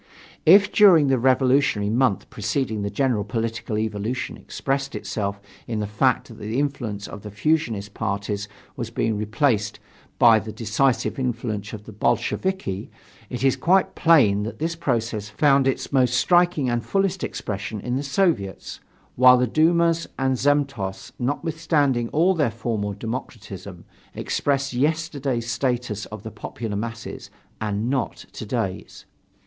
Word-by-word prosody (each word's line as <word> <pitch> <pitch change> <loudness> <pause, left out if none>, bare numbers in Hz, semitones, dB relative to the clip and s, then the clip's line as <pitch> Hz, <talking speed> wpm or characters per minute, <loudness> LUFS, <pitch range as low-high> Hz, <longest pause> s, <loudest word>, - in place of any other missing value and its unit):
If 200 +5 +7
during 175 -9 +6
the 130 -2 +3
revolutionary 130 -4 +3
month 125 -3 +1
preceding 110 0 -2
the 100 - -2
general 125 -4 0
political 115 -1 -3
evolution 110 +3 -2
expressed 135 0 -3
itself 100 -2 -3 0.3
in 110 -2 -2
the 105 - -1
fact 105 +1 +1
that - - -12
the 110 +3 -3
influence 120 -8 -2
of 105 - -9
the 105 - -8
fusionist 105 -3 -1
parties 100 +1 -3 0.3
was 120 -3 -4
being 115 -1 -1
replaced 105 0 0 0.4
by 115 -2 +7
a - - -1
decisive 115 +6 0
influence 115 -5 -3
of 105 -1 -8
the 110 - -11
Bolsheviki, 105 - -1 0.4
it 125 - -4
is 135 -2 +4
quite 190 +3 +2
plain 130 - +4
that 110 +2 -5
this 165 +2 -2
process 115 -8 -2
found 135 +4 +3
its 135 - -1
most 125 -2 +3
striking 175 -2 +3
and 120 -1 0
fullest 195 -2 0
expression 100 +1 -4
in 125 +4 -3
the 135 - -1
Soviets, 140 - -1 0.4
while 125 0 +7
the 125 - +2
dumas 165 +5 +2
and 130 0 +1
zemstvos, 135 -8 -1
notwithstanding 145 -3 0
all 175 +5 +3
their 150 -8 +1
formal 110 -3 -3
democratism, 100 -6 -7 0.3
expressed 140 -1 -1
yesterday's 140 -4 -1
status 120 -3 -2
of 105 -1 -9
the 110 - -7
popular 110 -3 -6
masses 115 +1 -6 0.3
and 105 +1 -1
not 130 -1 -2
to - - -7
day's. - - -4
120 Hz, 145 wpm, -23 LUFS, 105-140 Hz, 0.4 s, If